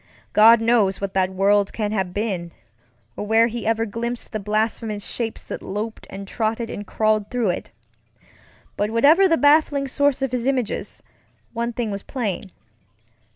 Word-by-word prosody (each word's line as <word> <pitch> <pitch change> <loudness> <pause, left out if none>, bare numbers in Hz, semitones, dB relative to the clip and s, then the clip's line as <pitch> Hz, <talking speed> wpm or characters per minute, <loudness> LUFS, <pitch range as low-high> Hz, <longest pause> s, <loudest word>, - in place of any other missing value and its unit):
God 225 +2 +7
knows 225 -5 +2
what 200 -1 -4
that 185 -1 +2
world 195 +1 +2
can 210 -2 -2
have 190 -4 -1
been, 185 -5 -3 0.6
or - - -4
where 225 +1 +5
he 235 -1 -4
ever 225 0 +1
glimpsed 235 +3 -4
the 215 - -3
blasphemous 215 0 -2
shapes 225 -2 -3
that - - -7
loped 215 +3 -5
and 195 0 -8
trotted 225 +2 -2
and 205 -1 -7
crawled 215 -1 +1
through 245 -5 0
it; 175 - -3 1.1
but 205 +1 -1
whatever 295 - +5
the 330 -2 +3
baffling 290 -1 +3
source 285 0 +1
of 270 - -1
his 250 0 -2
images, 255 -5 -2 0.5
one 235 0 -2
thing 230 -2 -3
was 200 0 -4
plain. 215 -7 -3
225 Hz, 160 wpm, -22 LUFS, 205-240 Hz, 1.1 s, God